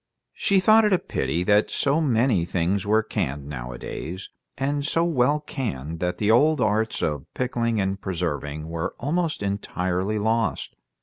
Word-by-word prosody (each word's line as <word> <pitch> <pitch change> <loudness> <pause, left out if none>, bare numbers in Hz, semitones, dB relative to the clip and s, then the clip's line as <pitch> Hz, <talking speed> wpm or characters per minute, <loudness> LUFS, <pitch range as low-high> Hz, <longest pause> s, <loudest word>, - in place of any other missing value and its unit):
She 195 -1 +2
thought 215 +4 +6
it 210 -2 +3
a - - +5
pity 80 - -2
that 105 +3 +3
so 145 +3 +1
many 120 - +2
things 90 +3 -1
were 110 +1 +3
canned, 70 -7 -3
nowadays, 70 +7 -6 0.3
and 140 +1 -1
so 165 +3 +1
well 145 -3 +2
canned 85 - -5
that 90 +1 -1
the 105 0 +2
old 150 +6 +4
arts 110 0 +1
of 75 -3 -2
pickling 115 -3 0
and 95 0 -1
preserving 75 -4 -3
were 80 0 -3
almost 155 -1 -1
entirely 100 0 -1
lost. 110 0 0
105 Hz, 150 wpm, -24 LUFS, 85-135 Hz, 0.3 s, thought